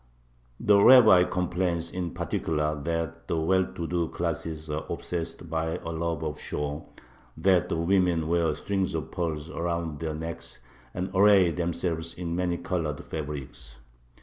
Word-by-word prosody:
The 100 -1 +5
rabbi 110 -8 +8
complains 90 -2 -1
in 90 -2 -3
particular 75 -2 -1
that 85 0 -3
the 80 - 0
well 95 +4 +2
to 85 - -3
do 85 0 0
classes 80 -1 -4
are 75 0 -3
obsessed 85 -1 -4
by 80 0 -1
a - - -7
love 80 -1 -2
of 75 -1 -4
show; 75 +1 -4 0.5
that 90 +1 +3
the - - -1
women 85 -2 +2
wear 85 -2 +1
strings 95 0 -1
of 80 - -4
pearls 80 -2 -3
around 85 -3 -3
their 80 -2 -3
necks, 80 +1 -7 0.4
and 95 +2 -3
array 95 -2 +6
themselves 85 -1 -2
in 85 -1 -3
many 90 -1 0
colored 85 -5 -3
fabrics. 65 -5 -7
85 Hz, 150 wpm, -27 LUFS, 80-90 Hz, 0.5 s, rabbi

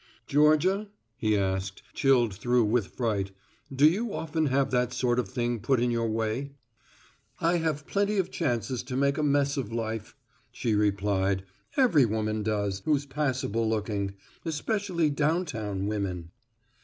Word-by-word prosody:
"Georgia," 155 - +3 0.3
he 110 -3 +1
asked, 95 -1 -2
chilled 125 -6 +3
through 120 +5 +2
with 110 -2 +1
fright, 105 -6 -1 0.4
"do 140 +3 +5
you 210 +8 +1
often 160 -1 -1
have 135 0 +1
that 125 -1 +1
sort 125 -1 +1
of 120 - -1
thing 120 0 -1
put 125 +4 +1
in 120 0 +1
your 115 -1 0
way?" 115 +5 -2 0.9
"I 170 +1 +2
have 155 -3 -1
plenty 205 +1 0
of 190 - 0
chances 120 -1 -1
to 130 -1 -5
make 140 +1 +2
a - - +2
mess 145 -1 +2
of 120 -5 -3
life," 110 -1 -4 0.4
she 115 - -1
replied, 100 -2 +1 0.3
"every 210 - +5
woman 110 0 -1
does, 100 -2 -1
who's 145 -2 +1
passable 130 -6 -1
looking, 105 -3 -2 0.3
especially 170 0 0
downtown 145 - -1
women." 95 -5 -3
125 Hz, 145 wpm, -28 LUFS, 105-150 Hz, 0.9 s, do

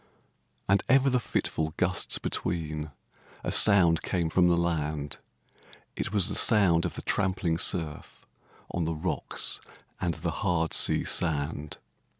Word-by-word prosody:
And 100 0 +3
ever 135 0 +4
the 125 - +2
fitful 80 -8 -2
gusts 90 0 +1
between 80 -3 -3 0.5
A - - -2
sound 85 -6 +5
came 85 -3 -2
from 90 +1 +4
the 85 -1 +3
land; 75 -4 -2 0.8
It - - -4
was 100 -3 +2
the - - -1
sound 95 -8 +4
of - - -4
the - - -7
trampling 95 -4 0
surf, 80 -6 -1 0.5
On 85 -2 -2
the 80 0 -2
rocks 75 - -2 0.4
and 85 -1 -1
the 85 +1 -3
hard 85 -5 0
sea - - +2
sand. 75 -2 -2
85 Hz, 140 wpm, -28 LUFS, 80-95 Hz, 0.8 s, sound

